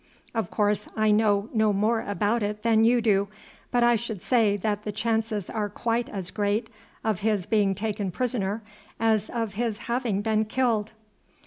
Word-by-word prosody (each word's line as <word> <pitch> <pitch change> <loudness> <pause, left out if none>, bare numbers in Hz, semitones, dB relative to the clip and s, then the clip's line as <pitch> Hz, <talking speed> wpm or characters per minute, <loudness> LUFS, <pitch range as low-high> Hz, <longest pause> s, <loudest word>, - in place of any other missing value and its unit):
Of 225 -6 -1
course 210 -1 0
I 215 0 +3
know 210 -1 +3
no 220 -2 +3
more 215 +3 +1
about 205 +3 0
it 210 0 -3
than 225 -1 +4
you 240 +1 +4
do, 200 -3 +2 0.4
but 245 -1 +2
I 240 0 +5
should 220 -4 -4
say 220 -5 +3
that 205 +1 -1
the 210 - -3
chances 220 -2 -1
are 210 -2 -2
quite 235 +2 -1
as 185 -3 -5
great 210 +2 -1 0.3
of 215 -5 0
his 210 -4 0
being 205 -3 +2
taken 205 -1 -2
prisoner 220 0 -2 0.4
as 220 -2 +2
of 225 -3 -3
his 225 0 -1
having 235 -3 -1
been 220 0 +1
killed." 220 -2 0
215 Hz, 175 wpm, -26 LUFS, 205-230 Hz, 0.4 s, I